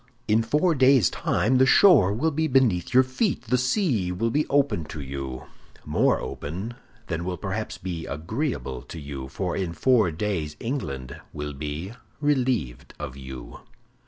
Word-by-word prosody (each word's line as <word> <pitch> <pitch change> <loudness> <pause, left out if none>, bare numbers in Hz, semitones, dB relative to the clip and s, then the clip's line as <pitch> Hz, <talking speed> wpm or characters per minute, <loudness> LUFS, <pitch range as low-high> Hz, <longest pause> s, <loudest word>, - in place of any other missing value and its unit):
In 110 +1 +4
four 150 +10 +2
days' 130 - +5
time 125 +4 +1
the 130 - +5
shore 130 - +6
will 140 +10 0
be 160 +2 0
beneath 125 - +2
your 130 +1 +6
feet, 130 - -1
the 125 +2 +1
sea 125 - +1
will 115 +6 -1
be 150 +5 +1
open 140 - +2
to 80 0 -8
you—more 70 -2 -2
open 95 +11 -5 0.3
than 85 +1 -3
will 90 0 -3
perhaps 100 +4 -4
be 85 -3 -5
agreeable 75 - -3
to 85 - -9
you, 70 -2 -6
for 85 +7 -3
in 90 -4 -2
four 115 +3 +3
days 80 -3 -2
England 70 - -4
will 75 0 -5
be 75 +8 -5 0.3
relieved 130 - 0
of 65 - -6
you." 65 -2 -9
100 Hz, 155 wpm, -25 LUFS, -, 0.3 s, shore